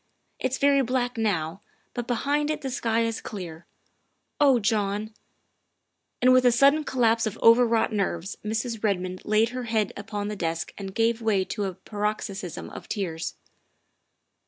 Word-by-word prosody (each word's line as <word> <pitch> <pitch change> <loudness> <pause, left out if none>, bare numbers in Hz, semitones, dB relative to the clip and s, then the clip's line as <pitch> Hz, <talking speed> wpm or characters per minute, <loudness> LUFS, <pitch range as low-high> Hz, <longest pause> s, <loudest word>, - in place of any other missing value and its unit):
It's 260 0 -1
very 280 -1 +4
black 250 0 -1
now, 195 -5 -1 0.3
but 240 -1 -4
behind 285 +5 0
it 310 - -2
the 270 - -4
sky 230 -2 0
is 230 -1 -2
clear. 175 -5 -8 0.7
Oh 275 -4 +6
John 210 0 0 0.5
" - - -52
And 255 0 +7
with 255 0 +5
a 245 - +6
sudden 275 +6 +4
collapse 230 -3 +2
of 215 +1 -5
overwrought 230 -1 +5
nerves 195 -2 -1
Mrs. 225 +1 -3
Redmond 185 -3 -1
laid 215 +2 +3
her 250 0 -5
head 220 -3 0
upon 205 0 -4
the 210 - -3
desk 165 -3 -3
and 195 -1 -7
gave 230 0 +2
way 205 -4 +2
to 205 +1 -3
a 190 -2 -4
paroxysm 205 -2 -4
of - - -10
tears. 170 -6 -3
220 Hz, 160 wpm, -26 LUFS, 200-245 Hz, 0.7 s, And